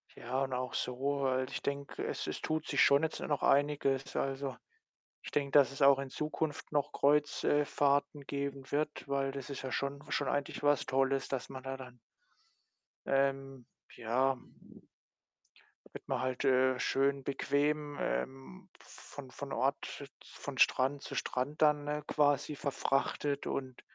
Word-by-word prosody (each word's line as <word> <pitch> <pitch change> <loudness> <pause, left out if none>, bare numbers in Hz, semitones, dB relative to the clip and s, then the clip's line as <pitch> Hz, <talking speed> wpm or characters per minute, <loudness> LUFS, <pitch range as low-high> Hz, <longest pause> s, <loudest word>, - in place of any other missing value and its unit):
Ja, 130 +1 -2
und 135 -1 -3
auch 125 0 -2
so, 125 0 -2 0.3
weil 130 0 +1
ich - - -4
denke, 140 0 -3
es - - -3
es - - -4
tut 155 0 -2
sich - - +2
schon 140 +2 +5
jetzt 160 - -1
noch 145 -2 -1
einiges. 140 -1 +2
Also, 135 0 -2 0.7
ich - - -7
denke, 140 -1 0
dass 140 -1 +5
es 135 - -4
auch 140 0 +7
in 135 -1 -4
Zukunft 150 +1 -3
noch 145 -2 0
Kreuz 145 +1 +2
äh, 145 0 +3
Fahrten 145 0 +1
geben 140 -1 -4
wird, 150 0 -2
weil 135 -1 0
das 140 0 -7
ist 140 - -5
ja 130 -1 -4
schon 140 0 -2
schon 145 - 0
eigentlich 145 0 -2
was 145 -1 +3
Tolles, 135 0 +1
dass 130 -2 -3
man 130 -1 -8
da 135 0 -3
dann 125 -2 -11 1.1
ähm, 135 -1 0 0.3
ja 130 +3 +1 1.5
da - - -20
wird - - -10
man - - -1
halt, 130 +1 -2
äh, 130 -1 +4
schön 140 +1 +1
bequem, 145 +2 0
ähm, 155 +9 -4
von 135 -3 -11
von 140 +1 -7
Ort 135 +1 0
z 140 -1 -8
von 145 -2 -8
Strand 135 +3 +3
zu - - -7
Strand 130 +3 -2
dann, 150 -1 +4
äh, 150 0 -1
quasi 145 0 +2
verfrachtet 140 0 -1
und 130 -2 -4
140 Hz, 165 wpm, -33 LUFS, 135-145 Hz, 1.5 s, auch